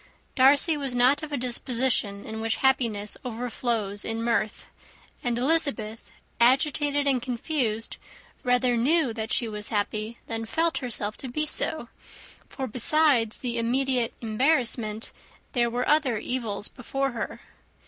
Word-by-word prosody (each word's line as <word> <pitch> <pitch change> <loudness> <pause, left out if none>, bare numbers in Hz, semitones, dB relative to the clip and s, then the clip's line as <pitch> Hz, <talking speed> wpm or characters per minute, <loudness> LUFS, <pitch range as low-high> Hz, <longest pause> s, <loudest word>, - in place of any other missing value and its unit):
Darcy 280 +4 +5
was 275 -4 -3
not 250 +4 +4
of 310 -1 -6
a 285 - -1
disposition 240 -4 0
in 220 0 -6
which 225 0 0
happiness 230 -6 +1
overflows 230 -4 -2
in 225 0 -3
mirth; 230 -2 -1 0.6
and 240 -1 0
Elizabeth, 255 -6 0 0.3
agitated 285 +3 +3
and 265 -3 +2
confused, 240 -2 -2 0.5
rather 250 0 +2
knew 270 +1 +2
that 220 0 -5
she 235 - +1
was 210 -1 -4
happy 215 +2 -2
than 225 -1 -4
felt 330 +7 0
herself 215 -5 -4
to 265 - -7
be 305 +5 -1
so; 310 -3 -2 0.6
for, 265 - -4
besides 250 -1 +3
the 235 -2 -2
immediate 250 0 0
embarrassment, 230 -2 0 0.4
there 240 -2 +1
were 245 +2 -2
other 290 -6 +3
evils 215 -3 -2
before 270 +2 -3
her. 235 - -5
245 Hz, 135 wpm, -26 LUFS, 225-270 Hz, 0.6 s, Darcy